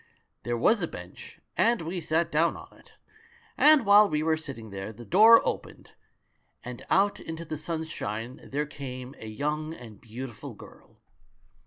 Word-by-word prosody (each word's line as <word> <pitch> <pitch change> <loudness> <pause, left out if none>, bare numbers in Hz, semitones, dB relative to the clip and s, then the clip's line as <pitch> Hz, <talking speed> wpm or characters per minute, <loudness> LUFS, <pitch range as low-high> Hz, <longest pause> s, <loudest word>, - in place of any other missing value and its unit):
"There 120 0 -2
was 215 - +3
a 170 - 0
bench, 90 - -11 0.2
and 230 -5 +2
we 175 +2 -4
sat 165 +1 0
down 165 +3 +2
on - - -13
it; - - -21 0.6
and 300 -5 +6
while 205 +1 +7
we 150 -1 0
were 160 0 +2
sitting 130 -9 -7
there, 95 +2 -6
the 120 +2 -12
door 220 - +7
opened - - -5 0.4
— - - -44
and 125 -1 -7
out 200 +1 +3
into 165 +1 -7
the 155 - -4
sunshine 150 -8 -5
there 145 +2 -2
came 130 -3 -8
a 110 - -8
young 150 +7 -3
and 110 -7 -13
beautiful 120 +1 -8
girl. - - -16
150 Hz, 165 wpm, -27 LUFS, 120-170 Hz, 0.6 s, while